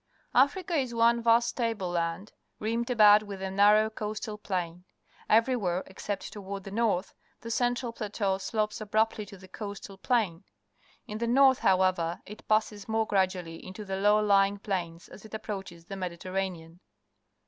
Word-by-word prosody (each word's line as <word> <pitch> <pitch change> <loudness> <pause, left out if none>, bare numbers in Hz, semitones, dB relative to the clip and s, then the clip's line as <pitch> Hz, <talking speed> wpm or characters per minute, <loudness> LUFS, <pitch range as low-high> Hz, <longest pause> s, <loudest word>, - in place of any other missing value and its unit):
— - - -40 0.2
Africa 360 +3 -6
is 260 -6 0
one 235 +1 +4
vast 235 +1 +3
table 225 -7 -1
land, 170 +4 -2 0.3
rimmed 230 +3 -2
about 210 -3 +7
wath 205 -2 -8
a 190 0 -4
narrow 210 +2 +5
coastal 215 0 -5
plain. 180 -4 -4 0.5
E^'erywhere, 215 -6 +2
except 195 +1 -6
toward 200 -1 -6
the 195 - -8
north, 205 -4 0 0.3
the 230 - -6
central 245 0 0
plateau 200 -3 -2
slopes 215 +2 -2
abruptty 215 0 0
to 200 - -11
the 185 0 -14
coastal 200 -1 -8
plain. 205 -8 0 0.6
In 210 +1 -6
the 235 - -1
north, 265 +2 +5
however, 185 -3 +2
it 210 +1 -12
passes 215 -1 0
more 220 0 0
graduallj' 185 -4 -1
into 190 +3 -8
low 205 +2 +2
hing 200 +1 0
plains 175 -4 -4
as 195 - -13
it 220 0 -8
approaches 195 -6 -7
the 195 - -8
^Mediterranean. 180 -2 -4
205 Hz, 155 wpm, -29 LUFS, 190-225 Hz, 0.6 s, about